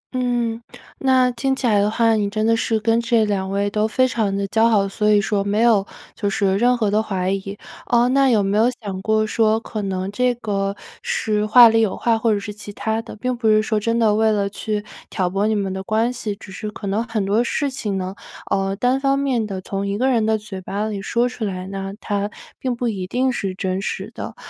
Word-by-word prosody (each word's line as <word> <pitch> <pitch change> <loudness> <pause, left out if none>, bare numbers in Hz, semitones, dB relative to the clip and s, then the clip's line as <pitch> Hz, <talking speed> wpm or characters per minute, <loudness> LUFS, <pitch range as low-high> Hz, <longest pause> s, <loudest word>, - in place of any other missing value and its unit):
嗯， 240 -2 -1 0.4
那 260 -2 +3
听 265 +3 -1
起 265 - -4
来 210 -3 +3
的 205 +1 +2
话， 225 +1 +2
你 210 -2 +1
真 215 +1 -1
的 230 0 +4
是 225 -1 0
跟 225 +2 +2
这 230 -1 +2
2 195 -2 -1
位 200 +1 0
都 215 +1 +1
非 255 +3 +2
常 220 -5 -1
地 200 - -1
交 225 +1 +3
好， 200 -3 +3
所 210 +2 0
以 210 - +5
说 200 0 0
没 205 +2 0
有 220 -4 +4 0.3
就 205 - -2
是 195 -1 +1
任 245 +1 +3
何 215 -3 0
的 210 +1 +3
怀 190 -3 -2
疑。 195 +1 -4 0.3
呃， 240 0 +3
那 275 0 +4
有 215 -5 +3
没 195 +1 0
有 225 - +5
想 195 -4 -5
过 215 +1 +1
说， 220 0 +2
可 215 -2 -5
能 190 0 -3
这 250 +3 +1
个 200 -4 -2 0.3
是 215 - -1
话 240 +2 +9
里 225 0 +3
有 215 - 0
话， 230 -1 +2
或 225 0 +2
者 205 - +1
是 210 +1 -6
其 205 0 -10
他 220 +1 -2
的？ 225 - -10
并 250 +3 -2
不 235 -2 -1
是 215 0 +4
说 215 -1 0
真 230 +2 0
的 220 -3 +3
为 220 +1 +3
了 200 -1 +1
去 210 0 -3 0.2
挑 185 -3 -1
拨 200 +2 +1
你 220 - +1
们 195 -2 -1
的 190 - -4
关 220 +5 0
系， 225 -4 -4
只 200 -1 -13
是 210 +2 -5
可 210 0 -9
能 200 +3 0
很 220 -4 -2
多 210 +5 +2
事 280 +2 -1
情 210 -7 -3
呢， 185 0 -3 0.4
呃， 195 0 0
单 250 +5 +1
方 275 0 +2
面 255 -6 0
地 190 -2 -5
从 195 +1 -3
1 200 +1 -2
个 260 +2 +2
人 230 -3 +2
的 220 0 +2
嘴 200 -3 -8
巴 205 +3 -3
里 205 -2 -4
说 235 +5 +1
出 245 -2 -6
来 185 -3 -3
呢， 195 0 -5
它 205 0 -2 0.3
并 255 -2 -2
不 240 0 -2
一 190 -5 -3
定 255 +5 +1
是 195 -6 -3
真 190 0 -2
实 - - -4
的。 - - -7
215 Hz, 255 characters per minute, -21 LUFS, 200-235 Hz, 0.4 s, 话